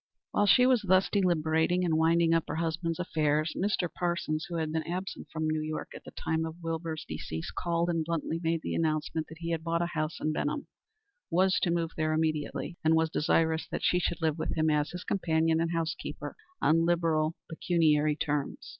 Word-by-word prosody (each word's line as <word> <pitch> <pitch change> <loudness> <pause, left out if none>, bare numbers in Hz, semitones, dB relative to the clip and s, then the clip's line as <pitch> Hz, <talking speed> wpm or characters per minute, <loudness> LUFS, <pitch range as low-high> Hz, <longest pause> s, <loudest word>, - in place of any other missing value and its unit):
While 205 - +2
she 250 +4 +6
was 255 -3 +4
thus 190 -1 +3
deliberating 175 -2 +2
and 165 -2 +1
winding 165 +1 +3
up 165 -1 +2
her - - -3
husband's 165 0 -1
affairs, 155 -3 0
Mr. 190 -2 0
Parsons, 170 -3 -1
who 170 - -4
had 160 -2 -1
been 160 0 0
absent 180 +3 -5
from 160 -1 -2
New 155 0 0
York 155 0 -4
at - - -10
the - - -8
time 160 0 -2
of 160 0 -4
Wilbur's 165 -2 -3
decease, 80 0 -5
called 170 0 -1
and 165 -2 0
bluntly 165 0 -2
made 165 -1 0
the - - -3
announcement 155 0 -1
that 160 - -11
he 170 0 -3
had 160 -1 -2
bought 170 +1 0
a 175 - -4
house 155 0 -2
in 155 - 0
Benham, 290 - -2 0.6
was 185 +1 +3
to 180 - +1
move 170 -1 0
there 155 -1 +1
immediately, 155 +2 -1
and 160 +1 +4
was 160 0 +2
desirous 160 0 +1
that - - -4
she 180 - +3
should 170 -1 -2
live 160 0 +1
with - - -2
him 155 0 +3
as 150 0 +1
his 180 0 -7
companion 160 -3 +1
and 165 0 0
housekeeper 165 -1 -3 0.2
on 165 +1 +3
liberal 165 -2 +1
pecuniary 155 -3 +2
terms. 145 -2 -2
165 Hz, 200 wpm, -29 LUFS, 155-170 Hz, 0.6 s, she